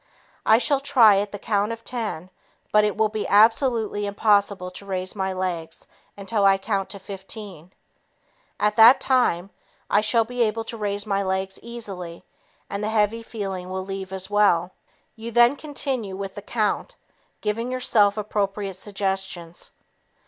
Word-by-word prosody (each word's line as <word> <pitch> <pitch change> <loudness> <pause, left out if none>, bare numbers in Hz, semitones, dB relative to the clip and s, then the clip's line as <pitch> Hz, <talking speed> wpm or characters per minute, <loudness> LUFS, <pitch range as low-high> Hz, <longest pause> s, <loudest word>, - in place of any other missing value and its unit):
I 220 - +7
shall 280 +3 +1
try 250 -8 +5
at 205 0 -3
the 205 - -5
count 205 +1 0
of 230 0 -7
ten, 210 -8 -4 0.4
but 210 0 +5
it 210 -1 0
will 220 0 +3
be 215 0 -3
absolutely 220 -1 +3
impossible 200 -2 +1
to 185 - -10
raise 185 0 -2
my 190 -1 -1
legs 175 -3 -4 0.3
until 200 +1 -1
I 195 0 +5
count 195 -1 -2
to 200 - -6
15. 190 -2 -9 0.9
At 210 0 +2
that 230 +4 +9
time, 205 -8 +1 0.4
I 205 - +4
shall 225 +1 +2
be 245 +1 -4
able 225 0 +1
to 225 - -7
raise 205 -1 -3
my 200 -2 0
legs 190 0 -2
easily, 195 -8 -7 0.4
and 200 +1 -4
the 215 - -1
heavy 220 +1 +1
feeling 195 -5 -5
will 185 0 -4
leave 195 -1 -6
as 190 0 -5
well." 200 -4 +2 0.4
You 230 0 -7
then 240 +3 +5
continue 270 -9 -3
with 195 -1 -5
the 205 - -8
count, 210 0 -2 0.5
giving 230 +3 -2
yourself 215 -5 +3
appropriate 200 -2 -2
suggestions. 190 -4 -4
205 Hz, 155 wpm, -24 LUFS, 190-225 Hz, 0.9 s, that